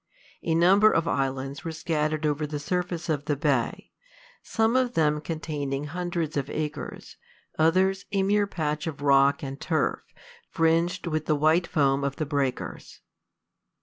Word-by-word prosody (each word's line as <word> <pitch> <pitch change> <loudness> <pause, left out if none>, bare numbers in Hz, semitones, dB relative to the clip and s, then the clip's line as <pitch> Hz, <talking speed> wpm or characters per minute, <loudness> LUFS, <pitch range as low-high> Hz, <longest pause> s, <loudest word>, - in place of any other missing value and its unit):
A 165 - 0
number 195 +6 +6
of 165 0 +1
islands 135 -1 -2
were 165 - -4
scattered 155 -1 -1
over 150 0 0
the 150 0 -4
surface 175 +2 -3
of 145 -3 -1
the 150 - 0
bay, 145 - -1 0.5
some 225 +1 +1
of 255 -1 +1
them 150 -2 +2
containing 150 -4 -3
hundreds 170 0 -3
of 140 -1 -2
acres; 150 -2 -5 0.4
others, 185 +4 +3
a 195 -1 +1
mere 205 +1 +2
patch 155 -4 -2
of 145 -2 -5
rock 140 0 +4
and 135 0 -6
turf, 155 -7 0 0.5
fringed 165 +3 +1
with 155 -2 -2
the 155 - +3
white 155 +4 +3
foam 140 -2 +2
of 140 -1 -1
the 155 - -2
breakers. 140 -3 -3
155 Hz, 150 wpm, -26 LUFS, 145-175 Hz, 0.5 s, number